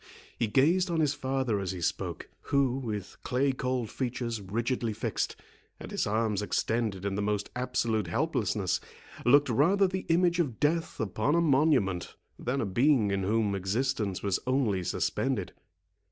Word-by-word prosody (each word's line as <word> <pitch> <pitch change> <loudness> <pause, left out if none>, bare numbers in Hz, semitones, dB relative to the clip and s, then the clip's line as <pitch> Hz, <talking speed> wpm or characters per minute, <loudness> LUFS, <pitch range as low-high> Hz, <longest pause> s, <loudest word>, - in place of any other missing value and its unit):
He 115 - 0
gazed 165 - +3
on 165 -1 0
his 150 -3 +2
father 130 -6 -1
as 95 -1 -3
he 90 - -6
spoke, 85 - -3 0.2
who, 135 -3 +2
with 105 -6 -5
clay 135 +2 +1
cold 125 -3 -2
features 120 -3 -3
rigidly 115 +3 -1
fixed, - - -2 0.4
and - - -9
his - - -1
arms 105 -1 0
extended 105 -2 -1
in 100 - -1
the 100 - -1
most 105 0 -1
absolute 115 -5 0
helplessness, 85 - 0 0.5
looked 145 +3 +6
rather 170 - +3
the 185 0 -4
image 175 +1 +3
of 135 -10 -1
death 160 +3 0
upon 110 - 0
a - - +4
monument, 135 - +2 0.2
than 130 +3 -1
a - - 0
being 115 +1 +3
in 100 0 0
whom 105 +1 +1
existence 100 +1 -1
was 100 -2 +1
only 120 -8 +1
suspended. - - -1
120 Hz, 155 wpm, -29 LUFS, 105-140 Hz, 0.5 s, looked